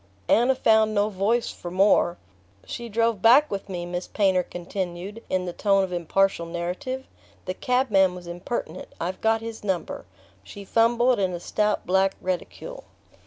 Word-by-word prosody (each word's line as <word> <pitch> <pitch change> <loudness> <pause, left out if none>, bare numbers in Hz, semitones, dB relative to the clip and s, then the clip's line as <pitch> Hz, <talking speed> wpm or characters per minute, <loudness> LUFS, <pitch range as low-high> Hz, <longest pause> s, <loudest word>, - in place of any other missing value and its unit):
Anna 245 +3 +4
found 220 -3 +3
no 205 +1 +2
voice 215 +4 0
for 175 - -8
more. 185 -1 +3 0.5
"She 235 -1 -6
drove 230 -1 +1
back 265 +8 +6
with 195 0 -4
me," 175 -2 -4
Miss 175 +1 -4
Painter 190 -3 +2
continued 180 +3 -6
in 185 -1 0
the 175 - -4
tone 195 0 +2
of 185 -1 -4
impartial 175 +1 +1
narrative. 180 +11 -4 0.4
"The 185 - -2
cabman 200 -6 +2
was 180 -1 -10
impertinent. 175 +7 -5
I've 180 +3 -4
got 225 0 +2
his 225 -1 -7
number." 190 -4 -3 0.4
She 200 -1 -10
fumbled 235 +3 +3
in 185 -2 0
a 175 - -4
stout 210 +4 -1
black 190 +1 +2
reticule. 185 - -5
195 Hz, 160 wpm, -25 LUFS, 180-225 Hz, 0.5 s, back